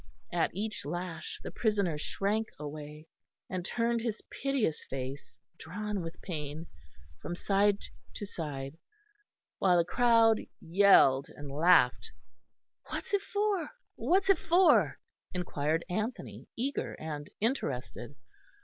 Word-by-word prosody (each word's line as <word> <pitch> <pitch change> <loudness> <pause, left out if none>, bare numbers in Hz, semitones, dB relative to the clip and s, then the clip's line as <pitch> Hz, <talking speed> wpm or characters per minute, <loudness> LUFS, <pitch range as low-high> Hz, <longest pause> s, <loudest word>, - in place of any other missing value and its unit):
At 175 - +2
each 215 +1 -3
lash 175 +3 -5
the - - -5
prisoner 200 -8 +1
shrank 210 +7 0
away, 150 +1 -7 0.5
and 185 -1 -2
turned 235 +4 0
his 225 -2 -3
piteous 265 - 0
face, 135 +1 -5 0.2
drawn 205 +4 -4
with 165 +1 -7
pain, 155 -2 -5 0.6
from 175 - -4
side 200 +2 +3 0.4
to 205 - -5
side, 145 -4 -5 0.8
while 180 -2 +4
the 170 - +3
crowd 230 +1 +4 0.2
yelled 165 -7 +5
and 145 -1 -9
laughed. 155 -3 +4 0.8
"What's - - -5
it 400 - +3
for, 405 -6 0 0.3
what's 390 +2 +3
it 390 - +2
for?" 355 +2 +4 0.4
inquired 165 -2 -1
Anthony, 215 +7 -4
eager 270 +4 -2
and 150 -2 -6
interested. 145 - -2
180 Hz, 115 wpm, -31 LUFS, 150-225 Hz, 0.8 s, yelled